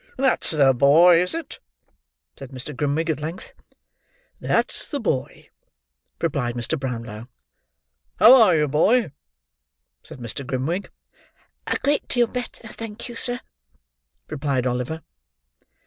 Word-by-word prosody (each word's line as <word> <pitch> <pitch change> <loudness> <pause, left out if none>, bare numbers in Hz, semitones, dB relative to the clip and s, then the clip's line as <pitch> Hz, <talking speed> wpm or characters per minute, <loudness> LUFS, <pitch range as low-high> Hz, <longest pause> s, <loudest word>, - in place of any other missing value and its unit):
"That's 265 -2 +2
the 140 -4 +4
boy, 165 +7 +6
is 180 - -2
it?" 330 - -7 0.8
said 135 - -10
Mr. 130 +2 -8
Grimwig, 150 +4 0
at 150 - -4
length. 160 +4 -7 0.9
"That's - - -1
the 290 - -3
boy," 155 - -3 0.7
replied 140 -7 -1
Mr. 120 +6 -1
Brownlow. 115 -3 -6 0.9
"How 250 +2 +8
are 185 -6 +5
you, 150 -1 +2
boy?" 170 - +2 0.9
said - - -12
Mr. 120 +3 -6
Grimwig. 135 +9 -3 0.8
"A - - 0
great 290 +1 +1
deal 245 -1 +2
better, 245 -1 -7
thank 225 +2 -8
you, 240 - -8
sir," 245 +1 -3 0.9
replied 135 -3 -2
Oliver. 125 +6 -3
155 Hz, 120 wpm, -23 LUFS, 130-220 Hz, 0.9 s, How